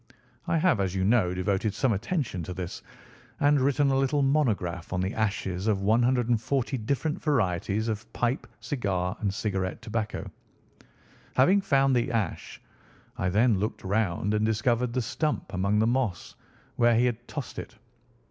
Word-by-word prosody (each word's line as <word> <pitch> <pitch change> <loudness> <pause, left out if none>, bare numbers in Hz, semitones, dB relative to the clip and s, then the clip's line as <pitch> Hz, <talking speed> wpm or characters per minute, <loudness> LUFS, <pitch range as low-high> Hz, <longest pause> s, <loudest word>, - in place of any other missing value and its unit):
I - - +2
have, 170 - +3
as 95 -1 -1
you 95 - 0
know, 105 -3 +3
devoted 95 +2 0
some 130 -4 +2
attention 120 - -2
to 90 - -6
this, 90 -1 -5 0.6
and 145 -1 +4
written 140 +1 +2
a - - +2
little 135 +1 +2
monograph 105 - 0
on 90 - 0
the 95 +2 -1
ashes 100 -3 -2
of 105 -3 +2
140 120 +3 +1
different 140 +7 -2
varieties 110 - 0
of 110 0 -4
pipe, 120 +2 -1
cigar, 100 -8 -2
and 100 -2 0
cigarette 95 -2 -2
tobacco. 110 -1 -3 1.1
Having 185 +10 +5
found 135 -6 +3
the 120 0 +1
ash, 115 -4 -3 0.6
I 90 - -1
then 105 +1 +3
looked 105 +3 -3
round 100 0 0
and 105 0 +1
discovered 115 +2 +1
the 125 -1 0
stump 150 +3 -2
among 100 +3 +1
the 110 - +3
moss 120 -8 -1 0.4
where 120 -1 +4
he 120 +2 +4
had 120 -1 -2
tossed 145 -4 -6
it. - - -9
110 Hz, 155 wpm, -27 LUFS, 100-130 Hz, 1.1 s, Having